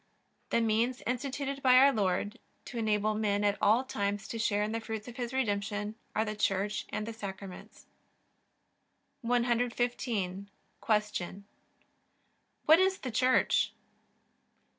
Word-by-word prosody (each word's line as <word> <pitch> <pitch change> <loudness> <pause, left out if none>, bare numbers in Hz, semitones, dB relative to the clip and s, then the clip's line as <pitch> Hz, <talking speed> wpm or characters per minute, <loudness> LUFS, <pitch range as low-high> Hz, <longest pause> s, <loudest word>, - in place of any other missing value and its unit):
The 235 - +2
means 230 +3 +1
instituted 275 +2 -3
by 255 -1 +6
our 275 +2 +7
Lord 205 0 -1 0.3
to 240 - -5
enable 215 -1 +1
men 210 -1 0
at 205 0 +3
all 225 +5 +4
times 205 -4 -2
to 230 - -4
share 210 -2 +1
in 210 - -2
the 225 - -1
fruits 220 -1 -6
of 240 - -9
His 240 -2 -3
Redemption 210 -4 -1 0.2
are 220 - +2
the 215 0 -3
Church 205 0 0
and 215 - -3
the 230 - -5
Sacraments. 195 -3 -9 1.4
115. 235 -5 0 0.3
Q. 210 -3 -1 1.2
What 315 +3 +7
is 380 0 +3
the 255 - -5
Church? 255 +3 +3
220 Hz, 130 wpm, -31 LUFS, 205-245 Hz, 1.4 s, our